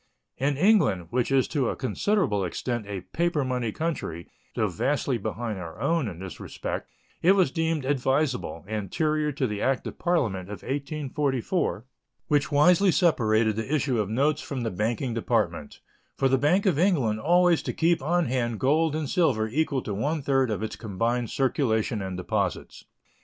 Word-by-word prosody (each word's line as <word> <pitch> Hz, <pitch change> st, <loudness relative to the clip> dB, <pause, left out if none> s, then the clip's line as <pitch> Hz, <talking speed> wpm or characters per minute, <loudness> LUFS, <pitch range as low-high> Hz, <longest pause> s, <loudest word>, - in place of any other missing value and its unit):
In 140 Hz, +1 st, +1 dB
England, 150 Hz, -, +3 dB
which 125 Hz, +1 st, 0 dB
is 135 Hz, -1 st, +3 dB
to 135 Hz, -6 st, 0 dB
a -, -, -2 dB
considerable 130 Hz, -, 0 dB
extent 115 Hz, +5 st, -3 dB
a 100 Hz, -2 st, -4 dB
paper 165 Hz, -, -1 dB
money 125 Hz, -3 st, -1 dB
country, 130 Hz, -, -4 dB, 0.3 s
though 110 Hz, -, +1 dB
vastly 130 Hz, -, -1 dB
behind 110 Hz, 0 st, -4 dB
our 85 Hz, +2 st, -8 dB
own 155 Hz, +1 st, +1 dB
in 90 Hz, -5 st, -6 dB
this 95 Hz, 0 st, -8 dB
respect, -, -, -5 dB, 0.3 s
it 185 Hz, +3 st, +6 dB
was 185 Hz, -9 st, +3 dB
deemed 160 Hz, -3 st, -1 dB
advisable, 130 Hz, -, 0 dB
anterior 150 Hz, -, -1 dB
to 135 Hz, -1 st, -1 dB
the 105 Hz, -3 st, -3 dB
act 135 Hz, 0 st, 0 dB
of -, -, -7 dB
Parliament 110 Hz, -, 0 dB
of 105 Hz, -, -8 dB
1844, 140 Hz, -, -2 dB, 0.4 s
which 145 Hz, +1 st, +2 dB
wisely 180 Hz, +6 st, +5 dB
separated 110 Hz, -, +2 dB
the 110 Hz, +5 st, -4 dB
issue 135 Hz, -5 st, +1 dB
of 105 Hz, -2 st, -1 dB
notes 140 Hz, +6 st, +1 dB
from 135 Hz, -3 st, -5 dB
the 115 Hz, -2 st, -2 dB
banking 115 Hz, +6 st, -1 dB
department, 110 Hz, -9 st, -1 dB, 0.4 s
for 135 Hz, -, +3 dB
the 135 Hz, 0 st, +2 dB
Bank 175 Hz, +9 st, +2 dB
of 175 Hz, -7 st, +2 dB
England 140 Hz, -, +2 dB
always 175 Hz, +4 st, +4 dB
to -, -, -3 dB
keep 170 Hz, -1 st, +1 dB
on 175 Hz, +4 st, +1 dB
hand 120 Hz, -3 st, -1 dB
gold 155 Hz, +3 st, +2 dB
and 155 Hz, -2 st, -2 dB
silver 135 Hz, -9 st, +2 dB
equal 140 Hz, 0 st, 0 dB
to 105 Hz, -, -4 dB
one 145 Hz, +9 st, -1 dB
third 135 Hz, -2 st, +2 dB
of 110 Hz, 0 st, -2 dB
its 110 Hz, -, -4 dB
combined 115 Hz, +3 st, -2 dB
circulation 115 Hz, -5 st, 0 dB
and 95 Hz, -1 st, -4 dB
deposits. 90 Hz, -, -3 dB
130 Hz, 170 wpm, -26 LUFS, 110-155 Hz, 0.4 s, it